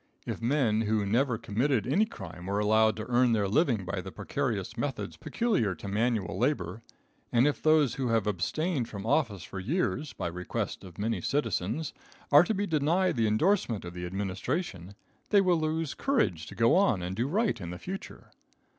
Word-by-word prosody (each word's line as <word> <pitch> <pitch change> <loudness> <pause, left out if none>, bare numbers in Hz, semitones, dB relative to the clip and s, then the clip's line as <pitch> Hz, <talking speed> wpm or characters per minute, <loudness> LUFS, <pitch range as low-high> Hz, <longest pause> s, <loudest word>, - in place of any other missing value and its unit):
If - - -4
men 115 -3 +2
who 105 -1 +1
never 120 +4 +1
committed 115 +2 0
any 190 - +2
crime 90 - -9
are 100 - 0
allowed 110 +1 +3
to 110 - -4
earn 125 0 +3
their 105 -3 +1
living 115 - +2
by 95 +1 -3
the 95 +1 -8
precarious 105 -1 -3
methods 120 -8 -3
peculiar 155 - 0
to 100 - -9
manual 110 -1 0
labor, 110 - 0 0.5
and 120 +2 +4
if 150 - 0
those 155 -5 +4
who 130 -2 -2
have 115 -3 +2
abstained 120 - -1
from 100 -2 -7
office 115 - +1
for 95 - -7
years, 150 - -1
by - - -5
request 90 +1 -3
of 90 -3 -12
many 105 -2 -1
citizens, 120 - -1 0.4
are 145 +3 +9
to 215 +5 -1
be 200 +2 0
denied 165 +3 +1
the 115 -2 +2
endorsement 115 - +1
of 85 - -7
the 90 0 -5
administration, 95 - -3 0.3
they 205 - +6
will 180 -3 +3
lose 155 -1 -1
courage 215 - 0
to - - -9
go 115 +5 +4
on 120 - +3
and 90 +2 -3
do 120 +5 0
right 210 +8 0
in 85 - -5
the 90 - -6
future. 190 - -8
115 Hz, 185 wpm, -29 LUFS, 100-150 Hz, 0.5 s, are